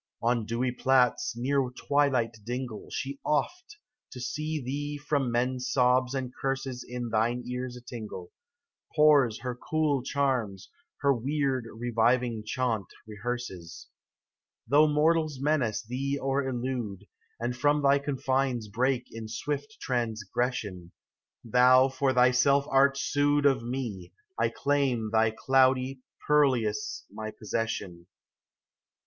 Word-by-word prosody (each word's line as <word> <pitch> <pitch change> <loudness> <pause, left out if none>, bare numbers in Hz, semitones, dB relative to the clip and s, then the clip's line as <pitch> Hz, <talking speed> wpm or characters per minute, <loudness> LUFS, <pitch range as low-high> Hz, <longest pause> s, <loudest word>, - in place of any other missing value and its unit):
On 115 -2 +1
dewy 120 +2 0
plats, 125 -2 +2
near 135 +1 +1
twilight 130 -3 +1
dingle. 120 -1 -5
She 140 +1 -4
oft, 335 - -2 0.3
to 125 - -8
still 125 +4 -4 0.2
thee 145 +3 -3
from 145 -3 -1
men's 125 +1 -1
sobs 125 0 +3
and 130 -2 -3
curses 135 -2 -2
In 120 -1 -5
thine 115 +3 0
ears 125 0 -4
a - - -11
tingle, 110 -7 -8 0.6
Pours 145 -8 +4
her 125 0 -3
cool 150 +2 0
charms, 130 -7 -1 0.3
her 140 -1 +4
weird, 135 0 -1
reviving 120 0 +1
chaunt 110 -2 -1 0.2
rehearses. 105 -6 -6 0.8
Though 150 +2 +5
mortals 155 -1 +2
menace 135 -7 0
thee 135 +4 -2
or 135 0 -1
elude, 120 -6 -3 0.3
And 120 +1 -2
from 145 +3 +2
thy 140 0 +5
confines 135 -4 -1
break 125 +4 +1
in 115 -1 -7
swift 145 - -4
transgression, 110 -5 -2 0.5
Thou 125 +3 +5
for 135 0 0
thyself 130 +2 +4
art 135 +1 +4
sued 145 +1 +1
Of 135 -3 +4
me, 120 -6 -5 0.2
I - - +1
claim 135 -6 0
thy 110 0 +4
cloudy 130 +2 +2 0.2
purlieus 145 - +1
my 110 0 -6
possession. 105 -5 -4
125 Hz, 120 wpm, -28 LUFS, 115-140 Hz, 0.8 s, Though